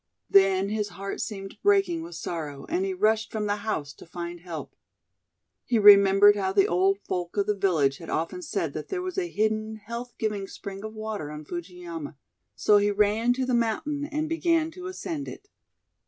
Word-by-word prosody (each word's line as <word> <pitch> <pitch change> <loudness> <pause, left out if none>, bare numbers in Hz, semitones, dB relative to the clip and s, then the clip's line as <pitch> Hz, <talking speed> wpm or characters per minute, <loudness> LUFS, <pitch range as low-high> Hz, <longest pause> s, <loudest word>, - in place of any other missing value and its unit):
Then 195 0 +5
his 210 -1 -1
heart 195 +1 -4
seemed 195 -3 -6
breaking 390 -4 +3
with 340 +2 -8
sorrow, 150 -5 -5
and 360 +3 0
he 390 - -1
rushed 220 -8 +1
from 215 -1 -2
the 205 0 0
house 155 -10 -3
to - - -14
find 175 0 -6
help. 170 -2 -8 0.9
He 235 - +1
remembered 200 0 +8
how 190 -2 -1
the 195 -1 +5
old 190 +3 +2
folk 180 +1 -3
of 200 - +2
the 210 - +1
village 165 -9 +1
had 165 - -9
often 165 - -2
said 330 - -2
that - - -5
there 370 -2 -3
was 370 +1 -2
a 350 -2 -2
hidden, 215 -1 -1
health 235 +3 -7
giving 210 -3 -2
spring 195 0 -8
of 220 0 -7
water 215 -8 -4
on 150 0 -8
Fujiyama, 170 -3 -7 0.4
so 205 - +4
he 205 0 +2
ran 210 +3 +2
to 260 +1 -1
the 255 - -1
mountain 285 +6 0
and 305 +1 -2
began 330 0 +1
to 365 +2 -8
ascend 335 -5 -5
it. 410 - -10
210 Hz, 190 wpm, -26 LUFS, 190-255 Hz, 0.9 s, remembered